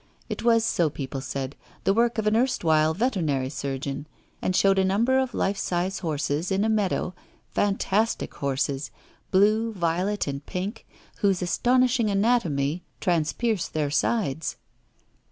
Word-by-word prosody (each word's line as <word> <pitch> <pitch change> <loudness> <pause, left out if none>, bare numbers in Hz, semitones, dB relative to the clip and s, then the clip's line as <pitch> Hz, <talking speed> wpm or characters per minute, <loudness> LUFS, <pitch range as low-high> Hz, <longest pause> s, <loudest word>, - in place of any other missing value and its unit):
It - - -4
was, 230 -1 +4
so 170 -7 +2
people 135 -2 -5
said, 135 +1 -4 0.3
the 195 - +3
work 235 +1 +2
of 220 - 0
an 210 +1 +3
erstwhile 160 -11 +2
veterinary 160 - 0
surgeon, 140 +1 -4 0.3
and 185 - 0
showed 195 0 +4
a - - +4
number 230 +8 +3
of 260 -1 -1
life 195 0 0
size 180 +2 -1
horses 155 0 -1
in 195 +1 +2
a - - +1
meadow, 205 -4 0 0.4
fantastic 205 +2 0
horses, 140 0 -2 0.4
blue, 215 +4 +3
violet, 180 +3 0
and 140 0 -4
pink, 200 +5 -4 0.3
whose 195 -3 +1
astonishing 245 +4 +2
anatomy 180 - +1 0.2
transpierced 180 +5 0
their 150 -2 0
sides. 160 - 0
190 Hz, 135 wpm, -26 LUFS, 150-220 Hz, 0.4 s, was